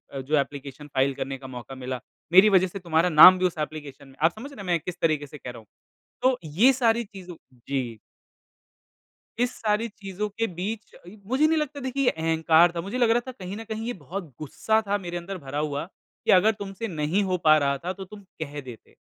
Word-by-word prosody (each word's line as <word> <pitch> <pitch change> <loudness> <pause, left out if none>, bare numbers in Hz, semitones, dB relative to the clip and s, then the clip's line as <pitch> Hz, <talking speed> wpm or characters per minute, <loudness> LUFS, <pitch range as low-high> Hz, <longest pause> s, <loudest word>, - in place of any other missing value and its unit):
अ, 135 - -3
जो 150 +4 +1
application 140 0 -5
file 135 +1 +2
करने 135 +1 -4
का 130 0 -10
मौका 130 +1 -8
मिला, 130 -1 -5 0.3
मेरी 190 +4 +8
वजह 190 -2 +4
से 190 +2 -7
तुम्हारा 170 0 +1
नाम 180 +3 +10
भी 185 - +2
उस 180 -2 -1
एप्लीकेशन 150 -2 -5
फाइल - - -17
में 135 - -18
आप 165 - +5
समझ 280 +4 -8
रहे 275 - -13
हैं 195 - -8
मैं 175 -1 +2
किस 180 +3 -7
तरीके 155 -3 +1
से 150 - -11
कह 125 - -8
रहा 120 - -11
हूँ। 110 - -19 0.6
तो 255 -1 +3
ये 185 - +4
सारी 235 -2 +2
चीज़ों 185 -4 -11 0.3
जी। 125 -5 -2 1.4
इस 245 0 +2
सारी 215 +1 0
चीज़ों 205 -1 -5
के 225 +3 -2
बीच, 205 +5 -6 0.3
मुझे 265 +6 +3
नहीं 320 0 +2
लगता 300 -2 -2
देखिए 265 +1 -2
ये 245 - +5
अहंकार 160 +1 +3
था। 170 - -1
मुझे 200 +8 -5
लग 240 -2 +3
रहा 235 - +4
था - - -4
कहीं 190 -6 -8
न 225 - -6
कहीं 220 +1 -4
ये 245 - -2
बहुत 185 - -6 0.2
गुस्सा 220 +9 0
था 205 +1 +1
मेरे 175 -3 -5
अंदर 185 +3 -6
भरा 145 -2 -5
हुआ 150 0 -2 0.4
कि - - +4
अगर 190 +4 +6
तुमसे 200 +3 -5
नहीं 165 +2 0
हो 185 -1 0
पा 155 -1 +7
रहा 140 -2 +1
था, 175 +6 -4
तो 190 0 -8
तुम 205 +2 -12 0.2
कह 145 -1 -5
देते 125 -4 -13
180 Hz, 230 wpm, -25 LUFS, 150-210 Hz, 1.4 s, नाम